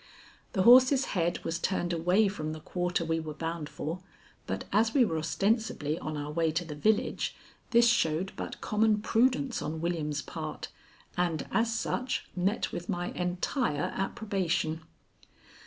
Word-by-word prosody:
The 190 - +2
horse's 255 +4 +7
head 170 -2 0
was 165 0 -1
turned 175 -1 -1
away 180 +6 +3
from 155 -6 -3
the 155 - -7
quarter 175 +1 -1
we 165 0 0
were 155 -2 -6
bound 165 -1 -4
for, 165 +4 -4 0.5
but - - -3
as 225 +4 +3
we 260 -4 +6
were 160 -6 -1
ostensibly 170 -3 0
on 155 -1 -4
our 145 0 -4
way 165 0 +1
to 170 +2 -1
the 155 - -6
village, 210 +9 0 0.3
this 235 0 +5
showed 185 -5 +2
but - - -6
common 210 0 +2
prudence 250 +3 +2
on 155 +2 -3
William's 155 -3 -2
part, - - -6 0.5
and, 170 -4 0
as 225 0 +2
such, 245 +2 -2
met 190 +4 0
with 175 - -6
my 175 0 -2
entire 180 - -1
approbation. 190 -6 -1
180 Hz, 155 wpm, -29 LUFS, 160-220 Hz, 0.5 s, horse's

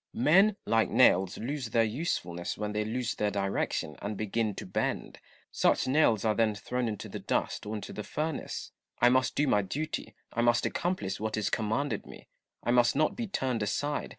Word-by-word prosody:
Cromioell. - - -2
Men, 195 +8 +6
like 115 -1 +2
nails, 95 0 +4
lose 130 0 -3
their 115 +1 +3
usefulness 105 - -2
when 105 0 -3
they 105 0 0
lose 120 +2 -2
their 105 - 0
direction 100 -6 -1
and 105 0 -4
begin 110 0 -1
to - - -6
bend: 90 - -2 0.3
such - - +2
nails 130 -6 +3
are 110 - +3
then 110 -1 +2
thi'own 125 +4 -2
into 105 -2 -4
the - - -6
dust - - -2
or 110 - -3
into 105 - -6
the - - -4
furnace. 155 +6 -4 0.3
I 120 - +6
must 130 0 +2
do 150 - +2
my 105 -7 +3
duty; 145 +11 -4 0.2
I 115 - 0
must 120 0 +3
accomplish 170 - -2
what 110 +1 -2
is 105 - -1
commanded 115 +6 -1
me; - - -12 0.4
I 120 - +1
must 120 -1 +4
not 155 +2 +2
be 235 -2 -3
turned 130 - -1
aside. 145 +8 -1
115 Hz, 195 wpm, -30 LUFS, 105-135 Hz, 0.4 s, Men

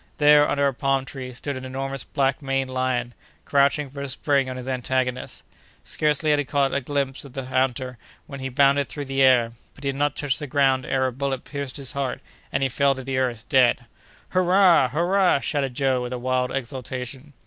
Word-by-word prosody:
There, 150 0 +6
under 140 0 +1
a 135 - 0
palm 135 +1 0
tree, 130 -2 -7
stood 140 +3 -4
an 130 - -7
enormous 135 +1 -4
black 135 +2 0
maned 135 -1 -1
lion, 130 -2 -1 0.3
crouching 140 +1 +2
for 140 +1 -8
a 140 - -3
spring 140 0 +1
on 130 - -5
his 125 0 -7
antagonist. 130 0 -2 0.4
Scarcely 150 0 0
had 150 - +3
he 145 - -1
caught 140 0 +1
a 140 - 0
glimpse 140 0 -2
of 140 -3 -12
the 135 -1 -5
hunter, 130 -1 -1 0.3
when 140 -1 -9
he 130 0 -4
bounded 140 +2 +3
through 145 -1 -6
the 135 0 -1
air; 125 -3 +5 0.2
but 140 - -14
he 140 - 0
had 135 - -2
not 145 +1 0
touched 140 -3 -1
the 150 - -5
ground 135 -1 +2
ere 130 0 +1
a 130 - 0
bullet 135 0 -3
pierced 140 -2 -6
his 135 -3 -3
heart, 135 -3 -3 0.3
and 135 - 0
he - - +3
fell 140 +2 +2
to 130 - -7
the 130 0 -2
earth 120 -4 -2
dead. 125 -2 +3 0.4
"Hurrah! 180 -6 +4
hurrah!" 180 +4 +2
shouted 135 -3 -2
Joe, 135 -2 +1
with 125 0 -4
wild 125 0 -1
exultation. 130 +2 -5
135 Hz, 205 wpm, -24 LUFS, 130-140 Hz, 0.4 s, There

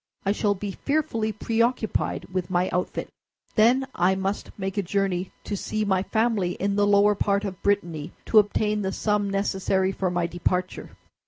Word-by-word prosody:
I 195 - +3
shall 205 0 +1
be 200 +1 -4
fearfully 230 -4 -1
preoccupied 230 +1 0
with 185 -2 -2
my 180 0 +1
outfit. 180 - -2 0.5
Then 245 +4 +4
I 180 +2 +2
must 195 +2 -2
make 195 0 -2
a - - +3
journey 190 -1 -1
to 205 - -3
see 215 +2 -2
my 190 -2 +2
family, 220 -4 0
in 200 +1 -1
the 205 0 +3
lower 205 +1 +5
part 200 0 0
of 190 -2 -6
Brittany, 170 -6 -1
to 220 - +6
obtain 210 0 +1
the 190 -1 -2
sum 210 -1 0
necessary 195 -1 0
for 190 -1 -1
my 175 -1 0
departure." 180 +1 -2
200 Hz, 170 wpm, -25 LUFS, 185-210 Hz, 0.5 s, to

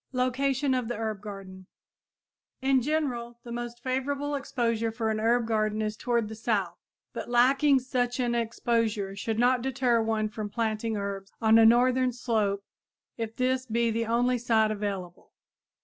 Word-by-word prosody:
LOCATION 265 +2 +1
OF 250 -3 -1
HERB 220 -3 -3
GARDEN 195 -3 -9 0.9
In 265 0 +3
general, 245 -5 -2
the 235 - -9
most 240 0 -6
favorable 280 +3 -2
exposure 235 -5 -1
for 225 -1 -1
an 215 - -1
herb 235 +2 +2
garden 215 -1 0
is 215 0 -2
toward 235 -1 0
the 220 - -7
south, 205 -6 -1 0.3
but - - -6
lacking 270 +4 +4
such 250 -1 -1
an 240 -1 +1
exposure 230 -3 -1
should 220 +2 -3
not 245 +1 +3
deter 250 -2 +1
one 220 -1 0
from 215 -1 -5
planting 220 0 -1
herbs 200 -1 -5
on 225 0 +5
a 225 - +8
northern 250 +2 +4
slope 215 -5 -1 0.5
if 225 -1 -5
this 255 0 0
be 235 0 +1
the 230 0 -1
only 245 +2 +2
site 225 -2 +2
available. 200 -4 -5
235 Hz, 155 wpm, -28 LUFS, 215-250 Hz, 0.9 s, a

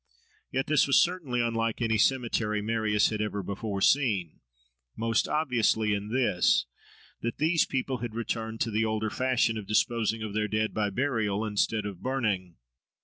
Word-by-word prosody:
Yet 135 +1 0
this 150 -2 +3
was 140 - +5
certainly 160 -9 0
unlike 115 -1 -1
any 110 -2 +1
cemetery 115 -4 +1
Marius 105 -1 +1
had 105 -1 -2
ever 105 -2 -2
before 100 +1 -4
seen; 105 - +2 0.6
most 115 0 +1
obviously 115 -7 +1
in 100 0 -3
this, 115 -8 +2 0.6
that 115 - -3
these 160 +1 +2
people 130 -1 -2
had 115 -1 -5
returned 115 -1 -3
to 115 - 0
the 110 +1 +1
older 110 -1 -1
fashion 125 -3 +1
of 100 - -9
disposing 110 0 +1
of 105 -2 -5
their 105 0 0
dead 110 0 -1
by 105 -1 0
burial 110 -3 -1
instead 105 0 0
of 100 -4 -6
burning. 105 -10 -1
110 Hz, 160 wpm, -28 LUFS, 105-125 Hz, 0.6 s, was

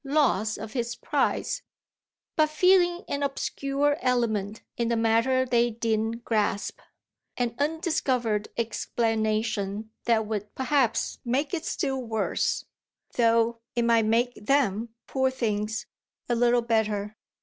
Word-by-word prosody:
loss 270 -7 +2
of 215 +1 -7
his 240 -2 -2
prize, - - 0 0.7
but 310 -1 +3
feeling 350 +2 +4
an 285 - -2
obscure 280 +1 0
element 220 -5 0 0.2
in 235 - 0
the 235 - +1
matter 230 +3 +3
they 240 -1 +3
didn't 225 0 -1
grasp, 210 -2 0 0.6
an 240 -2 0
undiscovered 275 - 0
explanation 220 -2 -1
that 225 -2 +3
would 210 -1 -4
perhaps 260 -3 +1
make 270 +6 0
it 330 - -1
still 265 -2 -1
worse, 225 -3 -1 0.5
though 230 0 +3 0.2
it 235 - +2
might 230 -1 +4
make 235 +3 +2
them, 230 -2 +1 0.2
poor 265 -1 +1
things, 220 -4 -2 0.4
a 240 - +1
little 240 0 +3
better. 215 -2 0
235 Hz, 120 wpm, -27 LUFS, 220-265 Hz, 0.7 s, feeling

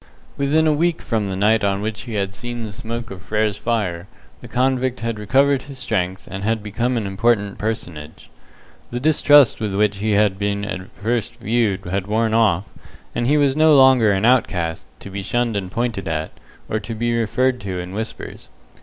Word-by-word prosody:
Within 145 +3 +2
a 155 - +4
week 170 +2 +1
from 110 -4 -2
the 95 - -3
night 105 +3 +2
on 100 -1 +1
which 110 +2 -4
he 110 - -4
had 100 -1 -1
seen 120 +2 -6
the 105 -2 -6
smoke 115 +2 -6
of 95 -2 -8
Frere's 105 0 -1
fire, 100 -7 -2 0.3
the - - -10
convict 130 0 0
had 115 -2 -3
recovered 135 +6 +3
his 140 0 -10
strength, 95 -6 -2
and 100 +1 -5
had 110 0 0
become 120 +4 -1
an 110 - -2
important 100 0 0
personage. 85 -8 -5 0.6
The 120 - -3
distrust 145 -2 +5
with 105 -3 -2
which 105 0 +2
he 105 +2 0
had 100 -2 +2
been 100 0 -1
at 95 -2 -6
first 115 +2 -2
viewed 115 -5 0
had 95 +2 -2
worn 110 +1 +1
off, 105 -6 +3 0.5
and 120 0 -1
he 150 +3 +4
was 140 -2 +3
no 155 0 +5
longer 130 -5 +6
an 100 +2 +1
outcast, 90 -10 +1
to 100 - -9
be 100 +1 -4
shunned 120 +2 -1
and 95 -2 -3
pointed 115 -3 -2
at, 80 -1 -2 0.4
or 110 - -1
to 115 +1 -6
be 120 +1 0
referred 125 +2 +1
to 95 -2 -4
in 90 +1 -6
whispers. 110 +2 -6
110 Hz, 195 wpm, -21 LUFS, 100-120 Hz, 0.6 s, longer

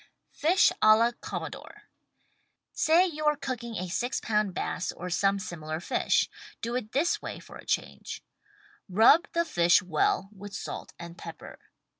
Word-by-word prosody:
FISH 350 +5 +4
A 215 0 +8
LA 230 +2 +3
COMMODORE 420 - -7 0.9
Say 330 +4 +4
you 305 -4 -4
are 300 - +4
cooking 245 -5 -5
a 185 -1 -3
six 245 +8 -1
pound 210 -4 0
bass 180 - -2
or 180 +1 -7
some 195 +3 +2
similar 155 -4 -5
fish 175 - +1 0.2
— - - -19
do 235 +1 -2
it 225 -4 -3
this 310 +6 +1
way - - -6
for - - -12
a - - -14
change: - - -3 0.7
Rub 225 - +6
the 340 0 +2
fish 175 - +4
well 180 +2 +1
with 205 0 -10
salt - - -6
and 170 0 -10
pepper. 165 -1 -10
215 Hz, 160 wpm, -28 LUFS, 180-280 Hz, 0.9 s, A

